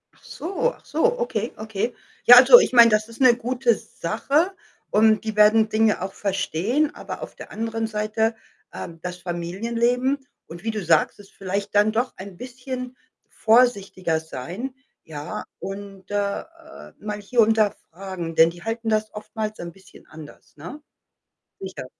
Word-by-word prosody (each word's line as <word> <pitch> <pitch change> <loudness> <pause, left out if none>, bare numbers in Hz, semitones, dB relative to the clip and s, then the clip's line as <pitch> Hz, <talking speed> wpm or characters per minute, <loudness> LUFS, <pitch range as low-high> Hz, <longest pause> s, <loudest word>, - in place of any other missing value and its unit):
Ach - - -27
so, 395 +8 -2
ach - - -23
so, 485 +1 +1
okay, 230 - -2
okay. 220 +2 -3 0.3
Ja, 245 - +11
also 250 -1 +10
ich 255 - 0
meine, 235 -1 +8
das 215 0 +1
ist 230 +3 -12
'ne 250 -2 +7
gute 245 0 +1
Sache 275 - -1 0.4
und 215 0 +3
die 220 -1 -4
werden 215 +1 +5
Dinge 215 -3 +2
auch 190 +1 -4
verstehen, 205 - -1
aber - - -8
auf - - -8
der - - -11
anderen 225 0 -3
Seite, 215 +1 -1 0.4
ähm, 165 -1 -8
das 180 0 -5
Familienleben 230 +10 -1 0.3
und 170 +2 -11
wie 225 - -1
du 215 -3 -4
sagst, 165 +3 +2
es 200 - -15
vielleicht 200 +2 -5
dann 210 +1 +4
doch 240 +3 -1
ein 190 -1 -10
bisschen 255 +1 -7 0.3
vorsichtiger 200 -8 +2
sein, 170 - -7 0.3
ja, 150 -1 -6 0.2
und, 195 -1 -8
äh, 200 -1 -1
äh, 330 -1 -15
mal 210 0 -5
hier 235 +4 -3
und 225 0 +3
da 210 -2 +4 0.2
fragen, 175 -2 -6
denn 160 0 +6
die 175 +1 -12
halten 225 +1 -3
das 215 0 0
oftmals 215 0 -5
'n 170 0 -6
bisschen 195 +3 -18
anders, 155 -1 -14
ne? 180 - -9 0.8
Sicher. 190 -9 -7
215 Hz, 165 wpm, -23 LUFS, 190-240 Hz, 0.8 s, Ja